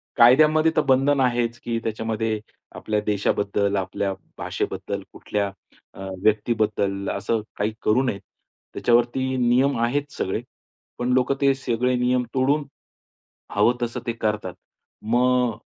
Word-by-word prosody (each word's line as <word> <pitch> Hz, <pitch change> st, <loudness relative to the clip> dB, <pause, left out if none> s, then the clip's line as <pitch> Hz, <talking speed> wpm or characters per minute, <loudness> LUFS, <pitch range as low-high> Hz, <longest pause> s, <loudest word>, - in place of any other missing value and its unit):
कायद्यामध्ये 155 Hz, +6 st, +6 dB
तर 155 Hz, -, +4 dB
बंधन 135 Hz, +2 st, +4 dB
आहेच 120 Hz, -2 st, +1 dB
की 115 Hz, -1 st, -3 dB
त्याच्यामध्ये 110 Hz, 0 st, -2 dB, 0.4 s
आपल्या 105 Hz, -1 st, -1 dB
देशाबद्दल 100 Hz, 0 st, 0 dB
आपल्या 95 Hz, +1 st, -1 dB, 0.2 s
भाषेबद्दल -, -, -3 dB
कुठल्या 100 Hz, -1 st, -2 dB, 0.5 s
अ, -, -, -14 dB, 0.2 s
व्यक्तीबद्दल 105 Hz, -2 st, +1 dB
असं 105 Hz, +3 st, -1 dB, 0.2 s
काही 105 Hz, +1 st, -1 dB
करू 110 Hz, +4 st, +3 dB
नये. 120 Hz, -7 st, -1 dB, 0.5 s
त्याच्यावरती 120 Hz, +2 st, +1 dB
नियम 125 Hz, +2 st, +3 dB
आहेत 140 Hz, +5 st, 0 dB
सगळे. 95 Hz, -3 st, -2 dB, 0.6 s
पण 120 Hz, +1 st, -2 dB
लोकं 130 Hz, +2 st, +2 dB
ते 140 Hz, -1 st, +5 dB
सगळे 125 Hz, -1 st, 0 dB
नियम 125 Hz, 0 st, +1 dB
तोडून, 140 Hz, +3 st, +2 dB, 0.9 s
हवं 120 Hz, -, +4 dB
तसं 120 Hz, 0 st, -2 dB
ते 115 Hz, -, 0 dB
करतात. 105 Hz, -2 st, -2 dB, 0.5 s
मग 125 Hz, +1 st, +2 dB
120 Hz, 120 wpm, -23 LUFS, 105-130 Hz, 0.9 s, कायद्यामध्ये